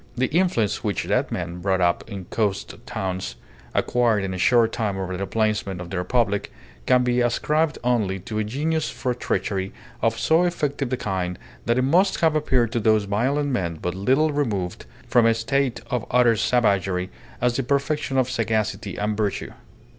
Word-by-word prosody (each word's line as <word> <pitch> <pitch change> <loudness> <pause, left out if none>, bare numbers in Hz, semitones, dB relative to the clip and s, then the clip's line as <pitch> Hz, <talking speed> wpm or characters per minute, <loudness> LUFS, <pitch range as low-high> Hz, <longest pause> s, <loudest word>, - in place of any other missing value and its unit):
The 130 +4 0
influence 170 - +1
which 105 -4 -1
that - - 0
man, 85 0 -4
brought 95 +1 +1
up 85 -1 +2
in 100 -4 -6
coast 100 -2 -1
towns, 95 -9 -3 0.4
acquired 115 -4 +2
in 95 -1 -3
a - - -4
short 115 +2 +4
time 105 -5 -2
over 95 -1 -3
the 100 +1 -3
plainsmen 105 -4 0
of 90 -1 -8
the 95 - -2
Republic 100 +1 0 0.4
can 125 -1 +5
be 125 0 +2
ascribed 150 +6 +1
only 110 -6 +1
to 110 +3 -4
a - - +1
genius 150 +8 -1
for 125 - -2
treachery 95 -5 -2 0.3
of 115 0 +1
so 160 +2 +3
effective 145 -7 -1
a 130 - 0
kind 90 -4 -2 0.3
that 120 +1 +2
it 130 - +2
must 180 +8 +3
have 160 -2 +3
appeared 130 -6 +2
to 120 - 0
those 110 -1 +3
violent 130 +9 0
men 85 -9 -1
but 90 - -2
little 130 +11 +2
removed 105 -12 -2 0.2
from 120 -1 +4
a 115 - +4
state 130 +2 0
of 125 -2 -1
utter 120 -2 +4
savagery, 100 -6 +1 0.3
as 125 0 +1
the - - +1
perfection 140 +1 0
of 130 -2 +3
sagacity 110 -4 -1
and 105 +1 -1
virtue. 105 -2 -2
115 Hz, 180 wpm, -23 LUFS, 95-130 Hz, 0.4 s, can